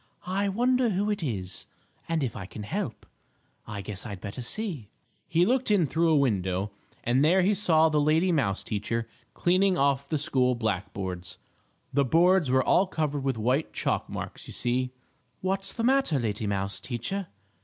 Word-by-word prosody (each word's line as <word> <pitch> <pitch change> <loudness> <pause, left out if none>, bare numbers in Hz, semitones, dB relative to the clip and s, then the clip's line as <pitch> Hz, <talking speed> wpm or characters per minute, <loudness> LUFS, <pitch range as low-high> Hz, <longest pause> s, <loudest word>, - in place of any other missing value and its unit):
"I 195 +2 0
wonder 245 +4 +2
who 205 +1 0
it 205 - -2
is, 100 - -4 0.4
and 165 -3 +1
if 125 - -2
I 95 -4 -6
can 105 +3 -8
help? 150 - -4 0.6
I 105 -1 -5
guess 100 -1 -4
I'd 100 -5 -6
better 100 +5 -6
see." 150 - -4 0.4
He 170 +2 +3
looked 255 +3 +1
in 200 -5 +4
through 165 +4 +1
a 155 - +5
window, 100 -6 0 0.3
and 125 +4 +3
there 180 +4 +4
he 200 +3 +3
saw 165 -5 +4
the 155 -2 +2
lady 160 +5 +3
mouse 120 - 0
teacher 115 +2 -2 0.3
cleaning 185 +1 +3
off 140 0 +1
the 155 - +1
school 130 -3 +2
black 110 -5 -2
boards. 90 -2 -5 0.6
The 140 +1 +4
boards 170 +3 +4
were 130 0 +4
all 190 +8 +4
covered 150 -5 -2
with 135 -3 0
white 125 +8 0
chalk - - -1
marks, - - -6
you - - -8
see. 125 +1 0 0.5
"What's 195 +1 0
the 230 - -3
matter, 260 - +3
lady 110 -3 -2
mouse 100 0 -2
teacher?" 150 - -3
140 Hz, 175 wpm, -27 LUFS, 110-185 Hz, 0.6 s, a